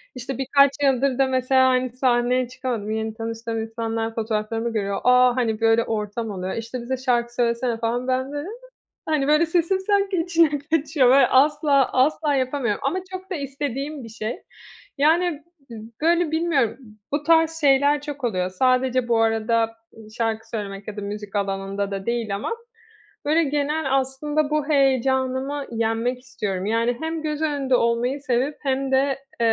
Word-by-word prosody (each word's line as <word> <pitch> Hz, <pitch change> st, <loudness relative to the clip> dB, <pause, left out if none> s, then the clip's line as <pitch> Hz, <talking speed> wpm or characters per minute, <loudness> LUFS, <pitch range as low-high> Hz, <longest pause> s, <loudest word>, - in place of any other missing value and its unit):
İşte, 255 Hz, +1 st, -5 dB
birkaç 280 Hz, +1 st, +4 dB
yıldır 270 Hz, -1 st, +2 dB
da 270 Hz, -, +3 dB
mesela, 260 Hz, 0 st, +3 dB
hani, 255 Hz, 0 st, +1 dB
sahneye 250 Hz, 0 st, +1 dB
çıkamadım, 245 Hz, -4 st, -4 dB
yeni 220 Hz, 0 st, -2 dB
tanıştığım 225 Hz, 0 st, -4 dB
insanlar 225 Hz, 0 st, -3 dB
fotoğraflarımı 225 Hz, +1 st, -2 dB
görüyor, 200 Hz, -2 st, -2 dB
aaa, 250 Hz, 0 st, +5 dB
hani, 225 Hz, -3 st, -1 dB
böyle, 225 Hz, 0 st, +4 dB
ortam 215 Hz, 0 st, -3 dB
oluyor, 185 Hz, -1 st, -4 dB
işte, 230 Hz, +2 st, -5 dB
”bize 260 Hz, +2 st, -3 dB
şarkı 240 Hz, -2 st, 0 dB
söylesene” 235 Hz, 0 st, 0 dB
falan, 235 Hz, +2 st, -2 dB
ben 260 Hz, +2 st, -1 dB
,böyle, 290 Hz, +5 st, -5 dB, 0.6 s
hani, 300 Hz, -3 st, 0 dB
böyle, 305 Hz, +2 st, +4 dB
sesim 345 Hz, +3 st, +1 dB
sanki 400 Hz, 0 st, +1 dB
içine 330 Hz, -4 st, +2 dB
kaçıyor 295 Hz, -2 st, +1 dB
böyle, 270 Hz, +2 st, +6 dB
asla, 285 Hz, 0 st, +3 dB
asla, 290 Hz, +3 st, +2 dB
yapamıyorum 255 Hz, -4 st, -1 dB
ama 335 Hz, +7 st, 0 dB
çok 375 Hz, +1 st, -7 dB
da 370 Hz, -, -2 dB
istediğim 280 Hz, 0 st, -4 dB
bir -, -, -9 dB
şey. 225 Hz, -, -5 dB, 0.6 s
Yani, 320 Hz, +1 st, +2 dB, 0.3 s
b -, -, -8 dB, 0.3 s
böyle, 340 Hz, 0 st, +3 dB
bilmiyorum, 315 Hz, -8 st, +1 dB, 0.3 s
bu 290 Hz, -, 0 dB
tarz 325 Hz, 0 st, +3 dB
şeyler 285 Hz, 0 st, +4 dB
çok 290 Hz, -2 st, -7 dB
oluyor. 185 Hz, -6 st, -1 dB
Sadece, 255 Hz, +4 st, +1 dB
bu 230 Hz, -1 st, +3 dB
arada, 225 Hz, 0 st, +1 dB, 0.4 s
şarkı 225 Hz, -1 st, -2 dB
söylemek 200 Hz, -2 st, -6 dB
ya 215 Hz, -, -6 dB
da -, -, -4 dB
müzik 205 Hz, 0 st, -6 dB
alanında 195 Hz, 0 st, -2 dB
da 195 Hz, +1 st, -5 dB
değil 235 Hz, -4 st, -1 dB
ama, 205 Hz, -, -4 dB, 0.7 s
böyle, 320 Hz, +3 st, +3 dB
genel, 290 Hz, -1 st, 0 dB
aslında, 290 Hz, +3 st, -1 dB
bu 305 Hz, -1 st, 0 dB
heyecanımı 265 Hz, 0 st, +1 dB
yenmek 230 Hz, +2 st, -1 dB
istiyorum. 210 Hz, -7 st, -4 dB
Yani, 230 Hz, +2 st, +1 dB
hem 320 Hz, 0 st, -3 dB
göz 305 Hz, 0 st, -3 dB
önünde 280 Hz, -4 st, +1 dB
olmayı 240 Hz, +4 st, 0 dB
sevip, 265 Hz, +1 st, -1 dB
hem 270 Hz, -1 st, -1 dB
de, 265 Hz, -, +5 dB
eee, 275 Hz, 0 st, -3 dB
255 Hz, 160 wpm, -23 LUFS, 225-290 Hz, 0.7 s, böyle